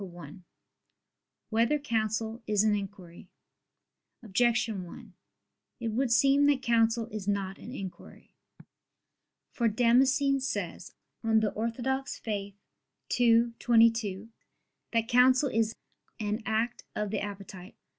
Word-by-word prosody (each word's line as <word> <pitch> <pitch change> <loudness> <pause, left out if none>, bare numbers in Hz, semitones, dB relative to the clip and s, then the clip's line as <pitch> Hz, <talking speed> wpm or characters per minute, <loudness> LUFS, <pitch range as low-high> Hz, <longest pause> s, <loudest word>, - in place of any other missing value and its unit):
1] 175 -1 -11 1.1
Whether 230 +6 +2
Counsel 225 -4 -2
Is 210 -1 +2
an 215 -1 +3
Inquiry? 195 -4 -7 0.9
Objection 225 -2 +1
1: 175 - -12 0.7
It 230 -2 -2
would 240 +3 0
seem 275 +4 +4
that 280 -2 +2
counsel 230 -1 +2
is 210 -2 -6
not 195 -1 -2
an 240 - -9
inquiry. 195 -8 -9 1.2
For 235 - 0
Damascene 260 +5 +3
says 265 +1 -4 0.3
(De 220 -2 +2
Fide - - -18
Orth. 255 +5 -2
ii, 225 +3 -1
22) 225 -3 +2 0.6
that 230 -1 +1
counsel 255 +3 +4
is 225 -1 0 0.4
"an 210 +1 -2
act 225 +2 -1
of 210 -1 -2
the - - -1
appetite." 195 -2 -8
225 Hz, 110 wpm, -29 LUFS, 205-245 Hz, 1.2 s, seem